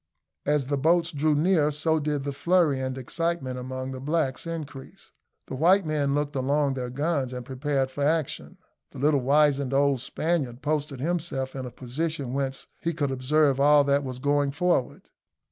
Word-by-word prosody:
As 145 -2 +2
the 140 +1 -1
boats 165 +3 +2
drew 150 +1 +1
near 155 -1 +3
so 160 +2 0
did 145 -2 -2
the 140 - -2
flurry 170 -2 +2
and 130 0 -3
excitement 135 -1 -2
among 130 +1 -5
the 130 -1 -7
blacks 150 0 -1
increase: 155 -5 -8 0.3
the - - -8
white 175 +8 +4
men 145 -2 0
looked 145 0 -2
along 140 +1 +1
their 125 -2 -4
guns 140 0 -1
and 125 -1 -6
prepared 135 0 -1
for 145 - -3
action; 155 0 -1 0.4
the - - -10
little 145 +1 +2
wizened 140 0 +2
old 140 -1 +3
Spaniard 135 -1 -2
posted 145 -3 -2
himself 150 -5 -2
in 130 -1 -4
a - - -8
position 135 +2 -4
whence 135 -1 -2 0.2
he 170 -1 -2
could 145 -3 -1
observe 140 +2 +2
all 145 +1 +6
that 140 0 +2
was 130 -2 -5
going 145 +1 +1
forward. 160 -3 -1
145 Hz, 175 wpm, -26 LUFS, 130-155 Hz, 0.4 s, all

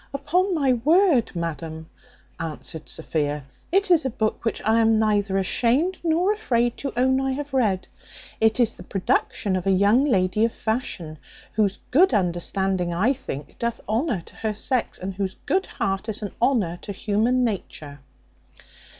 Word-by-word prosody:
"Upon 350 +7 +1
my 275 -5 +3
word, 305 - +3
madam," 160 -1 -4 0.5
answered 160 0 -6
Sophia, 150 -3 -2 0.3
"it 390 +1 +2
is 330 -3 +5
a 265 - 0
book 220 -3 -2
which 225 - -1
I 220 +1 +4
am 225 -1 +4
neither 205 -3 +1
ashamed 255 - +1
nor 345 +5 +2
afraid 240 - 0
to 275 - -4
own 260 +1 +3
I 270 0 0
have 285 +1 -5
read. 210 -8 +1 0.5
It 220 +1 +3
is 230 -2 +3
the - - -13
production 205 0 -1
of 185 +1 -2
a - - +4
young 200 +7 +4
lady 205 -5 +2
of 230 - +1
fashion, 190 -9 -3 0.3
whose 205 -3 +1
good 305 0 +5
understanding, 180 0 0
I 200 +10 +2
think, 245 - -8
doth 235 0 -2
honour 225 - 0
to - - -15
her 215 -1 -2
sex, 250 +3 -1
and 190 +1 -5
whose 190 0 -3
good 380 +1 +1
heart 195 +3 -2
is 215 0 -3
an 205 - -4
honour 210 -10 +1
to 205 - -6
human 225 +6 +1
nature." 155 -10 -4
220 Hz, 165 wpm, -24 LUFS, 190-260 Hz, 0.5 s, is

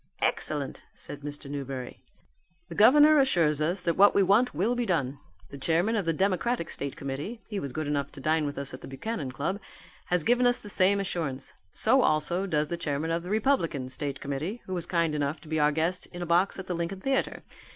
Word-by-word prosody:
"Excellent!" - - -1
said 145 - -9
Mr. 145 0 -7
Newberry. 135 -3 -6 0.7
"The - - -6
governor 295 - +7
assures 165 - +2
us 175 +5 0
that 170 -2 0
what 200 +2 +6
we 200 - +5
want 205 +7 +4
will 195 +11 0
be 245 - 0
done. 140 -6 -1 0.3
The 140 - -8
chairman 170 +10 +1
of 205 -5 0
the 165 - +2
Democratic 190 +3 0
State 140 -1 -4
Committee 145 - -5
(he 205 -2 -3
was 140 -7 -5
good 155 +4 -3
enough 145 -1 -1
to 145 - -10
dine 155 +2 +1
with 145 - -5
us 140 -1 -4
at 130 - -8
the - - -9
Buchanan 140 - -4
Club) 170 +9 -2 0.5
has 180 -2 +1
given 245 +4 +3
us 245 0 +4
the 205 - -10
same 200 +1 +3
assurance. 160 -8 -3 0.2
So 260 - +3
also 175 +2 +2
does 150 -4 0
the 170 - -2
chairman 155 0 -2
of 165 +1 0
the 180 - -8
Republican 205 - +1
State 140 +2 -3
Committee, 155 - -4
who 185 - -5
was 175 -2 -2
kind 170 -3 +1
enough 145 0 -1
to 160 - -15
be 160 0 -1
our 150 0 +4
guest 165 +4 -1
in 175 0 -7
a - - -3
box 175 +3 +2
at 190 - -6
the 185 - -3
Lincoln 170 +3 -3
Theatre. 270 +3 -1
170 Hz, 220 wpm, -28 LUFS, 145-200 Hz, 0.7 s, governor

